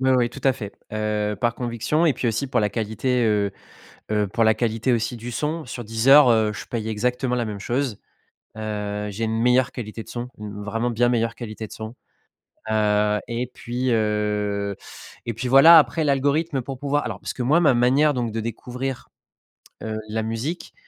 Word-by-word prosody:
Ouais, 130 0 +2
ouais 125 -2 +3
tout - - -11
à 135 - +4
fait. 105 -5 -7 0.2
Heu, 105 -1 -1
par 120 -1 +1
conviction 125 +7 0
et 150 - +4
puis 130 - -3
aussi 115 +4 0
pour 125 - +1
la 105 -2 +2
qualité, 115 +3 -1
heu 105 -2 +1 0.6
heu, 105 -1 +1
pour 115 +4 0
la 110 0 +5
qualité 115 +1 0
aussi 115 +1 -1
du 120 +2 -7
son, 155 +6 -2
sur 120 0 -6
Deezer, 125 +6 +6
heu, 110 -2 +2
je - - -7
paye 110 -2 -4
exactement 125 +3 -1
la 120 -2 -1
même 105 -2 -5
chose. 125 0 -2 0.6
Heu, 105 -1 -3
j'ai 110 +3 -2
une 110 0 -1
meilleure 125 +2 +3
qualité 115 -2 -6
de - - -16
son, 120 +1 -5
une 105 -1 -7
vraiment 115 +3 -1
bien 120 +1 +2
meilleure 115 -1 0
qualité 110 -2 -7
de - - -21
son. 110 +2 -7 0.8
Heu 105 -1 +2
et 120 +1 -2
puis, 125 +2 -2
heu 105 -2 0 0.5
et 115 - -2
puis 115 +4 -4
voilà 140 +6 +9
après 160 +1 +3
l'algorithme 140 +1 +1
pour 130 +1 -7
pouvoir 145 +1 0
alors - - -5
parce - - -5
que 125 - -4
moi 150 +7 +4
ma 150 -6 +4
manière 135 +5 +3
donc 120 -4 -2
de 115 - -3
découvrir, 125 +3 -5 0.7
heu, 110 0 -3
la 110 +1 -2
musique, 115 +10 -4
115 Hz, 195 wpm, -23 LUFS, 110-130 Hz, 0.8 s, voilà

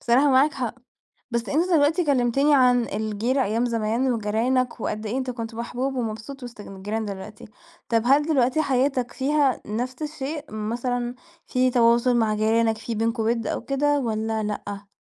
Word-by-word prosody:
بصراحة 265 +4 +3
معاك 270 +3 +4
حق. 245 -3 -3 0.6
بس 235 0 -2
أنتَ 340 +5 +1
دلوقتي 315 +4 +3
كلمتني 275 +1 +3
عن 250 -3 +4
الجيرة 220 +6 -1
أيام 225 +4 0
زمان 230 +2 0
وجيرانك، 235 +3 0
وقد 215 +1 -3
إيه 240 +5 -2
أنتَ 260 -1 -2
كنت 230 -1 -6
محبوب 250 +3 -3
ومبسوط 230 +4 -5
وسط 240 -3 -9
ن 195 -1 -10
الجيران 210 +3 -3
دلوقتي. 205 +1 -8 0.4
طب 230 -2 +2
هل 280 +3 +5
دلوقتي 280 -1 +2
حياتك 260 -2 0
فيها 280 -1 +1
نفس 245 +6 -4
الشيء؟ 300 0 -4
مثلًا 240 +3 -2 0.3
في 255 0 +2
تواصل 240 +1 +4
مع 220 -2 +2
جيرانك؟ 220 +1 +2
في 230 +1 -5
بينكم 225 +1 0
وِد 230 0 0
أو - - -2
كده 285 +2 +1
والّا 220 -2 -1
لأ؟ 205 -1 -5
240 Hz, 165 wpm, -24 LUFS, 220-265 Hz, 0.6 s, هل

